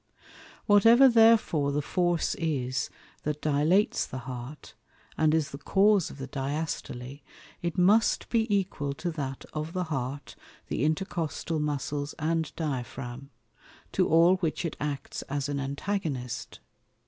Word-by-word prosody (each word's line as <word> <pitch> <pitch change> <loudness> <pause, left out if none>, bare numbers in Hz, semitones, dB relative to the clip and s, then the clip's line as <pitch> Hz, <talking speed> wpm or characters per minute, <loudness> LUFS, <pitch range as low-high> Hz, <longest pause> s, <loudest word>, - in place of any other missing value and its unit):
Whatever 225 +6 +7
therefore 225 - +4
the 145 +1 -1
force 175 0 +1
is, 130 -6 -1 0.3
that 150 0 -3
dilates 155 +8 +2
the - - -6
Heart, 125 -1 -8 0.4
and 155 -1 +3
is 155 -2 +1
the 140 - -7
cause 195 +3 +3
of - - -11
the 135 - -5
Diastole, 140 -1 -4 0.4
it 170 +1 -3
must 205 +5 +4
be 225 -2 +1
equal 180 -8 0
to 175 +5 -3
that 135 -4 -5
of 155 +2 -4
the 185 -1 -1
Heart, 130 -1 -4 0.3
the - - -1
Intercostal 160 -1 -2
Muscles 145 0 -2
and 160 -1 -1
Diaphragm; 135 -3 -5 0.6
to - - +2
all 170 +3 +5
which 170 -1 -2
it 165 - -3
acts 145 -2 -4
as 140 0 -1
an 145 -1 -2
Antagonist. 140 - -3
150 Hz, 135 wpm, -28 LUFS, 140-175 Hz, 0.6 s, Whatever